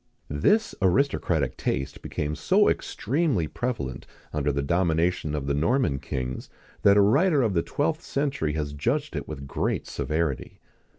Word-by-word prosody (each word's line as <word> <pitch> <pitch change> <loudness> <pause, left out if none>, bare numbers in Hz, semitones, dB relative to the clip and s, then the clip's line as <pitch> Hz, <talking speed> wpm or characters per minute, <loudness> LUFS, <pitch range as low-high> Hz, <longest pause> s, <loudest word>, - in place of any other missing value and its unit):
This 210 - +2
aristocratic 90 - +1
taste 70 +2 -2
became 75 0 -3
so - - +3
extremely 135 - 0
prevalent 105 - -4 0.3
under 75 -1 +1
the 70 0 -1
domination 85 0 +1
of 70 -2 -3
the 70 - 0
Norman 80 - +1
kings, 65 -2 -4 0.3
that 100 0 +6
a - - +7
writer 140 - +4
of 110 -4 +1
the 85 - +2
twelfth 155 - -1
century 135 - -1
has 75 -2 -3
judged 135 - -1
it - - -4
with 70 -3 -6
great 70 - -1
severity. 75 -3 -2
85 Hz, 145 wpm, -26 LUFS, -, 0.3 s, a